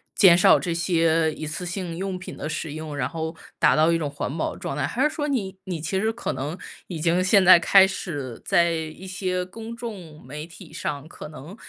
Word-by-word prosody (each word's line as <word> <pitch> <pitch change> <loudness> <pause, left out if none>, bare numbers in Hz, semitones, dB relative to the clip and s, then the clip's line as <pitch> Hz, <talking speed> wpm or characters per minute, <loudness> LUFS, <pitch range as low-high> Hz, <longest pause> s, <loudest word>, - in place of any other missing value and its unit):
减 175 -4 +7
少 - - +6
这 170 - -2
些 165 -2 +2
一 155 - -6
次 160 +4 -5
性 175 -2 -4
用 190 0 -3
品 180 - -8
的 150 - -5
使 155 -1 -4
用， 155 -2 -6
然 125 -2 0
后 160 0 -4 0.2
达 - - +4
到 155 +2 +5
一 170 - +3
种 150 -3 -2
环 145 +1 -4
保 - - -1
的 - - -11
状 140 - -4
态。 145 -1 0
还 240 - -3
是 - - -3
说 295 - -1
你 200 -9 -2
你 180 -3 -4
其 160 +5 -2
实 220 +3 +1
可 230 - -4
能 150 +7 -4 0.3
已 170 -4 -5
经 170 +3 +2
现 190 0 +4
在 185 -1 +10
开 190 +2 +6
始 145 -11 -5
在 170 0 +3
一 160 +3 -5
些 185 -1 -2
公 225 +4 -8
众 195 -10 -8
媒 150 +3 -6
体 170 -1 -14
上， 150 -2 -4
可 155 - -10
能 155 +5 -10
170 Hz, 245 characters per minute, -24 LUFS, 155-190 Hz, 0.3 s, 在